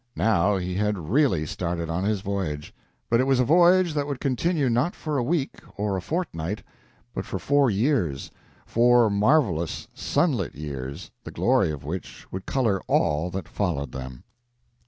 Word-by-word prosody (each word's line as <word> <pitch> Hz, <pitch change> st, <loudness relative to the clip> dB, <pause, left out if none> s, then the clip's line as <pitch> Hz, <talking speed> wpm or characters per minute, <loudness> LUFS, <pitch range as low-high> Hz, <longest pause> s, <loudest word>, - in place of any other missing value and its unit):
Now 100 Hz, -2 st, +3 dB
he 90 Hz, 0 st, -3 dB
had 105 Hz, +2 st, 0 dB
really 125 Hz, -, +3 dB
started 85 Hz, +1 st, -3 dB
on 85 Hz, +3 st, -2 dB
his 105 Hz, -2 st, 0 dB
voyage. 95 Hz, -3 st, -3 dB, 0.3 s
But 115 Hz, -, +3 dB
it 130 Hz, -, +3 dB
was 135 Hz, -2 st, +3 dB
a 125 Hz, -, +3 dB
voyage 175 Hz, +3 st, +5 dB
that 145 Hz, -1 st, -1 dB
would 140 Hz, -3 st, -3 dB
continue 145 Hz, +2 st, 0 dB
not 125 Hz, +8 st, +1 dB
for 150 Hz, -3 st, -2 dB
a -, -, 0 dB
week 145 Hz, +1 st, -1 dB, 0.2 s
or 100 Hz, -1 st, -1 dB
a 95 Hz, -, -2 dB
fortnight, 105 Hz, -, -3 dB, 0.5 s
but -, -, -3 dB
for -, -, -4 dB
four 140 Hz, -2 st, +3 dB
years 100 Hz, -, 0 dB, 0.3 s
four 120 Hz, -1 st, +4 dB
marvelous, 100 Hz, -, +1 dB
sunlit 130 Hz, -, 0 dB
years, 70 Hz, +2 st, -6 dB
the -, -, -8 dB
glory -, -, +2 dB
of 75 Hz, -3 st, -5 dB
which 85 Hz, +5 st, -6 dB
would 95 Hz, 0 st, -6 dB
color 110 Hz, -8 st, +1 dB
all 75 Hz, +4 st, +1 dB
that 95 Hz, +2 st, -5 dB
followed 75 Hz, -9 st, -2 dB
them. 65 Hz, -1 st, -8 dB
105 Hz, 165 wpm, -25 LUFS, 85-135 Hz, 0.5 s, voyage